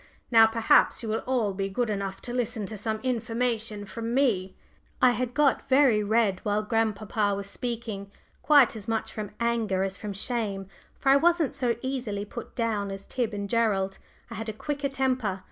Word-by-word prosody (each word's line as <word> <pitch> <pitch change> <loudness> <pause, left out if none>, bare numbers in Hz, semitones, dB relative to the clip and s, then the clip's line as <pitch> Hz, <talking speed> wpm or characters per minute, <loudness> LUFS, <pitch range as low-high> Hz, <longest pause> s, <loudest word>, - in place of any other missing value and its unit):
Now 225 -1 +8
perhaps 225 +1 +3
you 225 - -4
will 220 - -1
all 235 -6 +1
be 195 +1 -2
good 225 +3 -1
enough 195 -1 -4
to 240 - -5
listen 230 -4 -2
to 215 - -7
some 220 +1 -2
information 230 -3 -1
from 230 +3 -4
me." 200 -9 +1 0.4
I 250 - +6
had 245 0 -2
got 295 -3 +2
very 260 -6 +5
red 205 -3 +2
while 210 0 0
grandpapa 215 -2 0
was 200 0 -5
speaking, 220 -3 -5 0.3
quite 285 -6 +5
as 210 -2 -8
much 225 -1 -2
from 210 -2 -5
anger 225 -5 +1
as 195 0 -3
from 205 +1 -5
shame, 200 -2 -2 0.3
for 270 - 0
I 275 - +7
wasn't 335 -1 +2
so 240 -3 0
easily 240 -6 -3
put 235 +3 -9
down 220 -4 -1
as 195 0 -7
Tib 245 -4 -2
and 200 -1 -4
Gerald; 200 -4 +1 0.3
I - - -4
had 225 0 -5
a - - -3
quicker 280 +5 -3
temper. 255 -8 -1
225 Hz, 185 wpm, -27 LUFS, 205-245 Hz, 0.4 s, Now